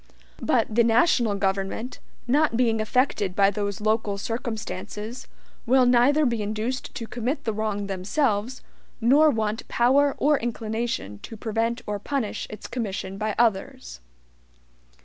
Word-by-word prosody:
But - - +1
the 235 +2 +4
national 230 -2 +3
government, 195 +5 -2 0.3
not 280 -1 +2
being 225 -3 +2
affected 215 -5 0
by 200 0 +4
those 200 0 -3
local 215 -1 0
circumstances, 220 0 -5 0.4
will 255 +1 +5
neither 250 +5 +4
be 235 -4 0
induced 215 +5 -3
to 230 - -4
commit 245 +6 -3
the 220 - -1
wrong 210 -1 -2
themselves, 205 +5 -1 0.4
nor 280 +7 +5
want 220 -3 -2
power 275 +4 +3
or 295 0 +3
inclination 225 - -3
to 225 - -9
prevent 230 +3 -1
or 205 -1 -3
punish 255 0 -3
its 215 - -9
commission 195 -5 -4
by 215 -1 -1
others. 190 - 0
225 Hz, 130 wpm, -25 LUFS, 205-245 Hz, 0.4 s, will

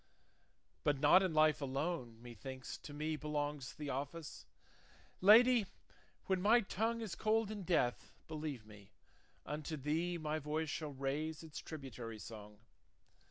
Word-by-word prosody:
But 145 -1 +2
not 150 +7 +7
in 190 -2 +1
life 155 -1 +4
alone, 135 -3 -2
methinks, 125 +3 -7
to - - -10
me 155 +2 -2
Belongs 150 -3 -3
the 150 -2 -4
office; 145 +4 -5 0.7
Lady, 225 +2 +7 0.6
when 190 -1 +1
my 225 +5 +6
tongue 225 +3 -1
Is 215 -5 -4
cold 220 0 +1
in 210 -2 -5
death, 165 -9 +1 0.2
believe 150 -7 -5
me, 105 -1 -15 0.5
unto 155 +2 -4
thee 160 +5 -1
My 155 -1 -2
voice 155 +1 -2
shall 155 -2 -3
raise 145 +4 -2
its 155 -2 -7
tributary 125 -7 -7
song. 105 -1 -10
150 Hz, 135 wpm, -37 LUFS, 135-175 Hz, 0.7 s, not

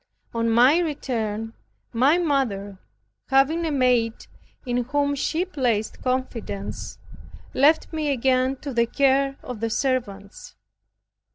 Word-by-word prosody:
On 230 0 0
my 250 +8 +5
return, 225 -9 -3 0.4
my 265 +8 +4
mother 230 - -1 0.5
having 290 +5 +2
a - - -1
maid 250 -4 +1 0.4
in 245 -1 -1
whom 285 +2 0
she 320 +5 -1
placed 245 - -1
confidence, 255 -6 -4 0.6
left 310 +4 +3
me 310 -2 -1
again 260 0 +1
to 280 -3 -5
the 235 -1 +2
care 275 +1 +2
of 245 -4 -7
servants. 210 -7 -3
255 Hz, 110 wpm, -24 LUFS, 230-285 Hz, 0.6 s, my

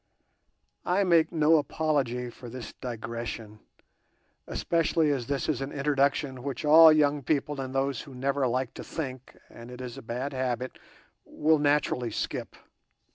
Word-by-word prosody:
I 185 +3 +2
make 165 -3 +3
no 160 0 +4
apology 135 -5 -1
for 120 0 -11
this 125 0 -8
digression, 115 -2 -6 0.9
especially 165 -2 +1
as 130 -5 -2
this 140 -1 -1
is 145 -4 -1
an 135 +1 -4
introduction 140 -2 0
which 140 +2 -4
all 160 +2 +9
young 150 -1 +3
people 145 0 -1
and 130 0 -6
those 135 -1 0
who 140 -3 -12
never 135 +1 0
like 125 +1 -1
to - - -8
think 130 -5 -6
(and 115 +1 -12
it 125 0 -10
is 125 -2 -7
a - - -10
bad 125 +5 -4
habit) 130 -1 -3 0.4
will 155 0 +2
naturally 145 -4 +1
skip. 105 - -4
135 Hz, 150 wpm, -28 LUFS, 125-150 Hz, 0.9 s, all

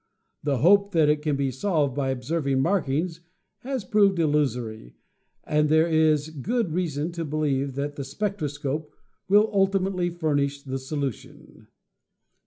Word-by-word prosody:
The 140 -2 0
hope 200 - +4
that 160 -3 +4
it 150 0 +2
can 150 -2 0
be 135 -1 -1
solved 145 -1 0
by 140 -2 -1
observing 135 +1 -1
markings 165 0 0 0.4
has 260 -5 -4
proven 190 -6 +3
illu 150 -1 +3
sory, 110 - -8 0.5
but 150 0 +2
there 160 +1 +5
is 155 -2 +2
good 195 - -2
reason 160 -2 -2
to 170 -1 -4
believe 140 -3 -1
that 145 +1 -3
the 140 - -3
spectro 185 +4 -3
scope 145 +1 -4 0.3
will 210 +2 +5
ultimately 195 -2 +1
furnish 145 -4 -1
the 135 -1 -4
solution. 135 -2 -6
150 Hz, 145 wpm, -25 LUFS, 140-175 Hz, 0.5 s, there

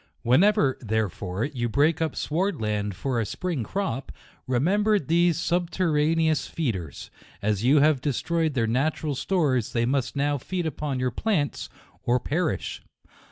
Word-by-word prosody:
Whenever, 145 - +3
therefore, 105 -3 -2
you 120 -5 -3
break 150 +6 +2
up 160 -3 -1
sward 185 +4 -1
land 105 -2 -2
for 125 +5 -1
a - - +1
spring 160 - -3
crop, 140 - -3 0.4
remember 200 - +2
these 170 0 +2
subterraneous 165 -3 +1
feeders. 95 - -4 0.3
As 105 0 -1
you 140 +4 +5
have 150 -3 +3
destroyed 160 +3 0
their 115 -3 +2
natural 145 +6 0
stores, 135 - 0
they 115 -1 +1
must 130 +1 -1
now 145 0 0
feed 180 +5 -3
upon 150 -4 -3
your 125 0 0
plants 170 - -1 0.3
or 125 +1 +2
perish. 155 - -2
145 Hz, 140 wpm, -25 LUFS, 120-165 Hz, 0.4 s, you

